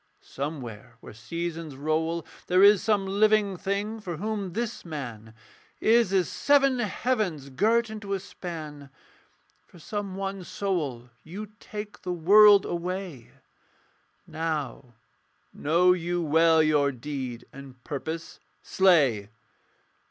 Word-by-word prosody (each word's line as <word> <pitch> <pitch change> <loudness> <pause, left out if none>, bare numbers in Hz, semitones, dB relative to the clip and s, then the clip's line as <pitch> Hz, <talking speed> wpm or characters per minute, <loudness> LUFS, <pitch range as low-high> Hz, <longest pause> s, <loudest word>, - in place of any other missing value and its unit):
somewhere 135 -7 -7
where - - -12
seasons 165 +5 -5
roll 160 +3 -1 0.2
There 185 +2 +4
is 205 -1 +7
some 210 -3 +1
living 205 0 +2
thing 200 +4 -3
for 175 -6 -6
whom 205 -2 -3
this 235 +2 -3
man 120 -9 -7 0.4
Is 230 -3 +3
as 190 -3 +2
seven 275 -3 +3
heavens 210 - -1
girt 225 - +2
into 205 -2 -5
a 195 - -1
span, 155 -7 -8 0.8
For - - -17
some 200 +2 -5
one 195 -1 -4
soul 165 -11 -3
you 200 +6 -8
take 210 0 -8
the 180 - -3
world 200 +4 +7
away 175 -6 -5 1.0
Now 150 -6 -4 0.6
know 175 +4 +3
you 175 0 -2
well 160 0 +4
your 145 -2 +3
deed 130 -2 -6
and 135 -2 -12
purpose. 160 +3 -6 0.2
Slay!' 140 - +3
175 Hz, 115 wpm, -26 LUFS, 150-200 Hz, 1.0 s, is